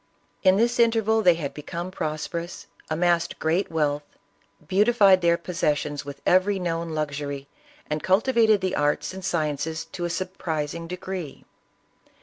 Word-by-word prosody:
In 190 0 +5
this 235 +2 +2
interval 225 -1 +3
they 180 -5 +5
had 150 -4 -4
become 170 +4 -6
prosperous, 165 +1 -4 0.2
amassed 170 +1 +1
great 165 +5 0
wealth, 150 -2 0 0.7
beautified 200 -1 +5
their 170 0 +3
possessions 150 -4 -1
with 140 -1 -9
every 185 +2 +3
known 165 -2 -3
luxury, 145 -2 -3 0.4
and 150 0 -2
cultivated 220 +1 +3
the 185 -1 -1
arts 145 +5 0
and 190 0 -8
sciences 160 -3 -2
to 175 - -5
a - - -2
surprising 170 -3 -3
degree. 180 -3 -6
170 Hz, 135 wpm, -25 LUFS, 155-190 Hz, 0.7 s, In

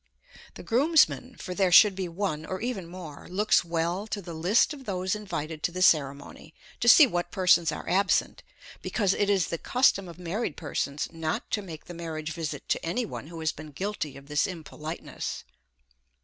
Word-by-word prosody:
The - - -9
groomsman, 260 -1 +3
for 180 - -6
there 185 -1 +2
should 205 +3 +8
be 190 -1 -3
one 170 -3 -3
or 185 +3 -5
even 230 -7 -3
more, 170 -5 -10
looks 205 +3 +3
well 170 +4 -2
to 210 - -3
the 175 -3 -8
list 180 - +2
of 275 -3 -11
those 185 -2 -1
invited 160 -7 -5
to 175 - 0
the 185 +1 -1
ceremony, 140 0 +1 0.2
to 235 - +4
see 300 +6 +10
what 175 -8 -2
persons 180 -3 +3
are - - -7
absent, 190 +2 +1 0.4
because 200 -4 +1
it 205 - 0
is 195 -4 +2
the 170 - -3
custom 200 -7 +2
of 170 - -11
married 180 +1 -3
persons 145 -2 -3
not 160 -1 -3
to 210 - 0
make 165 -6 -9
the 175 - -9
marriage 160 -2 -5
visit 160 -2 -5
to - - 0
any 180 +9 -1
one 155 - -7
who 165 0 -8
has 160 - +1
been 155 0 -10
guilty 185 -5 -4
of 140 - -13
this 150 0 +1
impoliteness. 160 -2 -6
175 Hz, 190 wpm, -27 LUFS, 160-200 Hz, 0.4 s, see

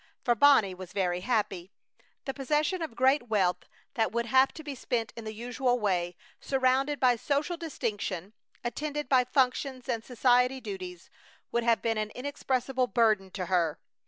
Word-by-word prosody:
For 240 - +3
Bonnie 235 -6 +5
was 185 -1 -10
very 180 -3 0
happy. 205 -4 -1 0.5
The 270 - -3
possession 300 +6 0
of 315 -8 -5
great 260 0 +3
wealth 185 -4 +1 0.2
that 225 -5 +1
would 235 +1 -1
have 260 +3 +4
to 315 - -9
be 290 -1 -5
spent 235 -3 -2
in 230 - -8
the 215 - -4
usual 245 +3 -1
way, 180 -4 0 0.2
surrounded 270 +2 +1
by 250 -2 +4
social 290 +8 -1
distinction, 205 - -4 0.3
attended 295 +4 -3
by 255 -1 +4
functions 255 0 0
and 230 -3 -2
society 250 +2 +2
duties, 185 -6 -8 0.4
would 235 - 0
have 230 -1 +3
been 225 -1 0
an 215 0 -2
inexpressible 260 -1 -1
burden 215 -6 +2
to 185 -1 -4
her. 170 -4 +1
245 Hz, 160 wpm, -29 LUFS, 205-265 Hz, 0.5 s, Bonnie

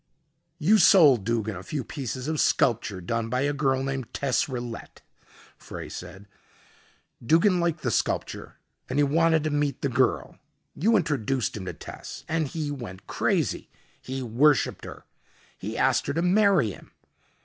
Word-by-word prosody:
"You 195 +7 +4
sold 145 - +6
Duggin 110 -2 -1
a 90 - -7
few 140 +7 -4
pieces 130 -1 -5
of 155 -1 0
sculpture 105 -6 +1
done 115 +5 -2
by 125 +2 0
a 145 +1 +1
girl 135 -2 0
named 135 -3 -4
Tess 135 -2 0
Rillette," 120 -3 -7 0.6
Frey - - -8
said. 100 +1 -9 1.0
"Duggin 170 - +3
liked 170 -2 -1
the 125 - 0
sculpture - - -2 0.3
and - - -2
he 145 - +4
wanted 160 +2 +3
to 155 - -1
meet 145 -2 -1
the 140 - +1
girl. 125 - 0 0.3
You 220 +7 +2
introduced 135 - -1
him 100 -3 -6
to - - -5
Tess - - -10
and 160 -1 0
he 150 0 -4
went 105 -10 -8
crazy. - - -1 0.3
He 130 0 -5
worshipped 130 +6 +2
her. - - -10 0.5
He - - -6
asked - - +2
her 140 - -1
to 165 +3 0
marry 185 - +3
him. - - -14
135 Hz, 160 wpm, -26 LUFS, 115-155 Hz, 1.0 s, sold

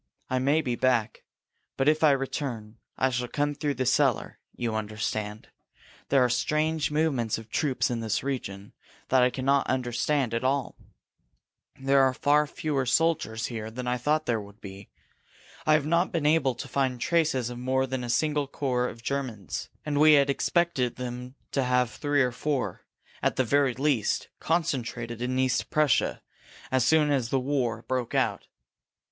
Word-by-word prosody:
I 130 - +2
may 140 +5 +2
be 125 -5 -2
back. 120 -3 0 0.5
But 135 - +1
if 155 +1 +3
I 155 - +7
return, 130 -5 -2 0.2
I 130 0 +2
shall 125 0 -2
come 145 +3 -1
through 145 -1 -2
the 130 +1 -1
cellar - - +1 0.2
you 115 -2 -2
understand? 110 0 -3 0.6
There 135 -2 +4
are - - +3
strange 155 +5 0
movements 150 -7 0
of 110 0 -11
troops 135 -4 0
in 120 - -1
this 110 -2 -1
region 105 -8 -5 0.4
that 130 -1 +4
I 125 - +5
cannot 135 +2 +1
understand 130 +1 0
at 115 +2 -1
all. 135 0 0 1.0
There 135 +1 +3
are 130 -1 +3
far 150 +1 +3
fewer 140 -3 -2
soldiers 155 -7 +1
here 110 -2 -5
than 125 +3 -6
I 125 0 0
thought 155 +5 +1
there 115 -3 0
would 100 +1 -14
be. 100 -1 -10 0.8
I 155 - +6
have 155 -2 +3
not 170 +3 +2
been 165 -3 -1
able 150 -4 +3
to 140 - -7
find 130 -2 -1
traces 140 -5 +1
of 120 - -7
more 130 +1 +1
than 130 -1 -3
a 120 - -5
single 145 +3 +1
corps 125 -3 -1
of 115 - -12
Germans 125 -8 -4 0.2
and 145 -1 0
we 155 0 +7
had 140 -1 +5
expected 140 -4 0
them 125 +1 -6 0.2
to 135 - +1
have 125 -2 +1
three 145 -2 +1
or 125 - 0
four, 140 +2 -2 0.4
at - - +1
the 130 - +2
very 135 0 +2
least, 135 -4 0
concentrated 120 -8 -2
in 125 +1 -1
East 130 -1 +1
Prussia 150 -5 +1 0.5
as 130 -2 +3
soon 155 0 +4
as 130 -5 0
the 135 - +1
war 125 -4 -1
broke 125 0 -2
out. - - 0
130 Hz, 175 wpm, -27 LUFS, 120-145 Hz, 1.0 s, I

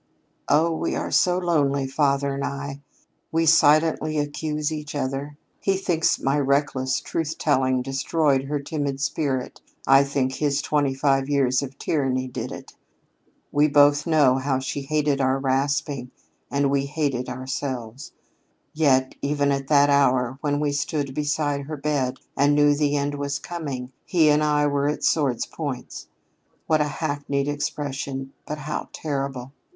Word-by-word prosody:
"Oh, 160 +3 +4
we - - -2
are - - -3
so 180 0 +3
lonely, 145 -6 +1
father 140 0 +1
and 140 0 -3
I. 140 0 -5 0.5
We 165 +1 +1
silently 155 0 +4
accuse 150 +1 -2
each 150 -1 -5
other. 140 +1 -3 0.2
He 195 -1 +1
thinks 175 -4 +1
my 140 +2 +1
reckless 135 -1 +1
truth 160 -1 -3
telling 130 -3 +1
destroyed 135 +1 +1
her 145 +1 -2
timid 140 -1 -3
spirit; 140 -2 -2 0.2
I 135 +1 +6
think 135 -2 -1
his 140 0 0
twenty 145 -3 +1
five 135 0 +1
years 135 -3 +2
of 135 -1 -7
tyranny 130 -4 -1
did 125 - -5
it. - - -9 0.8
We 145 +1 +4
both 145 +1 +4
know 145 -5 +4
how 135 0 0
she 130 +2 -3
hated 145 0 0
our 130 0 +2
rasping, 135 -1 -1 0.4
and 140 -1 +1
we 140 0 +1
hate 145 -1 -1
it 125 0 -4
ourselves. 130 -1 -5 0.6
Yet, 130 -4 +2
even 140 0 +1
at 135 -1 -2
that 145 -1 +5
hour 130 -2 +2
when 145 -1 0
we 150 -1 0
stood 145 -2 -2
beside 145 0 -1
her 155 -1 -5
bed 140 -3 -1 0.2
and 145 +1 +3
knew 145 0 +5
the 145 0 +1
end 145 0 -1
was 145 0 -2
coming, 140 -6 -6
he 160 -4 +3
and 150 +1 +3
I 150 -1 +2
were 140 -1 +1
at 150 - -3
sword's 140 -6 +1
points. 140 -6 -6 0.6
What 155 -1 +2
a - - +2
hackneyed 145 -1 -2
expression, 140 -2 -4
but 150 - -4
how 150 +1 -5
terrible! 135 -4 -4
140 Hz, 155 wpm, -24 LUFS, 135-150 Hz, 0.8 s, I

